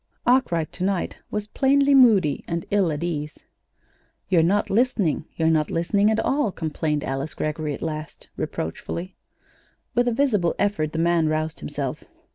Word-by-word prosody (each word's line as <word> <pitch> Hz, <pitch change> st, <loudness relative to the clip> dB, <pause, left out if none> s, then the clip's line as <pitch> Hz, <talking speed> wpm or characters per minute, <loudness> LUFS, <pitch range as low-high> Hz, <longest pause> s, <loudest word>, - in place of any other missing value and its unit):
Arkwright 175 Hz, -, +2 dB
to 180 Hz, -, -5 dB
night 190 Hz, -1 st, -1 dB
was 210 Hz, -1 st, -3 dB
plainly 280 Hz, +5 st, +3 dB
moody 220 Hz, -, +5 dB
and 170 Hz, 0 st, -3 dB
ill 200 Hz, -5 st, +2 dB
at 150 Hz, +2 st, -3 dB
ease. 150 Hz, -3 st, -4 dB, 0.9 s
"You're 180 Hz, -4 st, +4 dB
not 195 Hz, +5 st, +1 dB
listening. 210 Hz, -, +1 dB
You're 160 Hz, -, +1 dB
not 155 Hz, -1 st, +1 dB
listening 200 Hz, +5 st, +2 dB
at 220 Hz, -, +1 dB
all," 275 Hz, -5 st, +1 dB
complained 155 Hz, -3 st, -2 dB
Alice 135 Hz, +3 st, -3 dB
Greggory 155 Hz, -1 st, -2 dB
at -, -, -9 dB
last, 155 Hz, -1 st, -6 dB
reproachfully. 170 Hz, -, -5 dB, 0.8 s
With 245 Hz, 0 st, +2 dB
a -, -, +3 dB
visible 225 Hz, -9 st, +1 dB
effort 155 Hz, -7 st, 0 dB
the -, -, -3 dB
man 165 Hz, -1 st, +2 dB
roused 155 Hz, 0 st, -2 dB
himself. 75 Hz, -, -4 dB
170 Hz, 155 wpm, -24 LUFS, 155-210 Hz, 0.9 s, moody